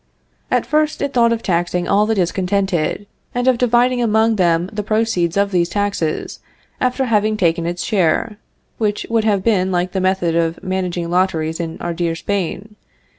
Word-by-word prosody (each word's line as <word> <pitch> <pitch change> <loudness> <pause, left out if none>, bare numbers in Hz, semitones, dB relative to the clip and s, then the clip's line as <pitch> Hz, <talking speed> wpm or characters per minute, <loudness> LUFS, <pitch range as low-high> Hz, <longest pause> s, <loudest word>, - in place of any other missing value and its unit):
At - - +1
first 305 0 +1
it 280 - -2
thought 235 -1 +4
of 230 -1 -1
taxing 175 0 0
all 205 +2 +3
the 225 - +1
discontented, 190 -1 0 0.3
and 245 +1 0
of 255 -2 +3
dividing 245 +1 +2
among 220 0 +2
them 170 -1 +2
the 210 - -2
proceeds 210 -5 0
of 200 0 +2
these 175 -2 +1
taxes 200 -5 -2 0.4
after 255 +1 0
having 215 -2 +1
taken 170 -3 +1
its 175 +1 -3
share; 205 +1 0 0.4
which 210 -2 -1
would 225 -1 +2
have 200 -3 +1
been 190 -4 +2
like 180 0 0
the 190 - -1
method 185 -3 +1
of 165 0 -1
managing 180 -2 -2
lotteries 170 -3 0
in 165 -1 -4
our 175 - -2
dear 170 -1 -1
Spain. 200 +3 -4
190 Hz, 175 wpm, -18 LUFS, 175-220 Hz, 0.4 s, thought